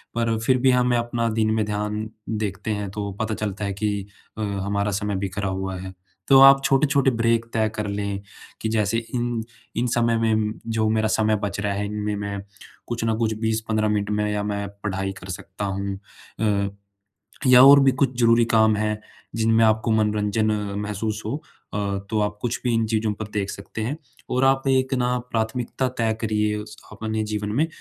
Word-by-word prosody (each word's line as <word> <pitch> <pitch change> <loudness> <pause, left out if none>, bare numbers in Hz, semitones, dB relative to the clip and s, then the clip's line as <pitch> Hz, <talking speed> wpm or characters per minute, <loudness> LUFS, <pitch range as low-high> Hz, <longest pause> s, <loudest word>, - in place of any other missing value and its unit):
पर 115 -1 +1
फिर 130 -1 +4
भी 130 -1 +5
हमें 125 -1 +3
अपना 120 0 -1
दिन 110 0 +1
में 110 0 +1
ध्यान 105 +1 -3 0.2
देखते 105 -1 -2
हैं, 105 -1 -2
तो 100 -1 -4
पता 110 0 -1
चलता 105 -1 -3
है 100 - -2
कि 100 -1 -2 0.3
अ, - - -4
हमारा 100 0 -1
समय 100 +1 -1
बिखरा 95 +1 -2
हुआ 95 0 -3
है। 95 0 -7 0.3
तो 135 - +7
आप 135 0 +8
छोटे-छोटे 140 -1 +3
ब्रेक 115 0 +1
तय 110 -1 +2
कर 105 -1 -2
लें, 100 -1 -3 0.4
कि 110 - -1
जैसे 110 0 +1 0.2
इन 120 -2 -1 0.3
इन, 120 +2 +1
समय 115 -1 +2
में 110 -1 +1
जो 110 -1 +1
मेरा 110 0 +2
समय 110 0 +2
बच 100 0 -2
रहा 100 -1 0
है, 100 +1 -2
इनमें 105 0 -2
मैं 100 0 -4 0.5
कुछ 120 -1 -3
ना 110 - +1
कुछ 110 -1 0
20-15 110 -1 0
मिनट 105 -1 0
में 105 0 0
या 105 0 -1
मैं 100 -1 -2 0.2
पढ़ाई 95 -1 -2
कर 95 - -10
सकता 95 +3 -5
हूँ। 100 0 -2 0.4
अ, 100 -2 +1 0.8
या 125 0 +9
और 140 +1 +10
भी 135 - +5
कुछ 130 -2 0
ज़रूरी 115 0 +5
काम 110 -1 +4
हैं, 105 0 -1 0.4
जिनमें 115 0 +3
आपको 110 +1 +2
मनोरंजन 105 0 +1 0.3
महसूस 105 +1 -3
हो 115 +6 -2 0.4
अ, - - -1 0.3
तो 110 - 0
आप 105 0 -1
कुछ 120 -1 -1
भी 120 -2 +1
इन 115 0 +2
चीज़ों 110 -1 0
पर 110 +2 -6
देख 100 -2 -1
सकते 100 +2 -7
हैं। 125 +7 -2 0.4
और 130 +1 +2
आप 135 0 +3
एक 130 0 +2
ना 125 0 +1
प्राथमिकता 115 +3 -1
तय 115 -1 +1
करिए 105 -1 +1
उस 105 0 -8 0.2
अपने 110 0 -3
जीवन 105 -1 -3
में 160 +2 +3
110 Hz, 190 wpm, -23 LUFS, 105-115 Hz, 0.8 s, और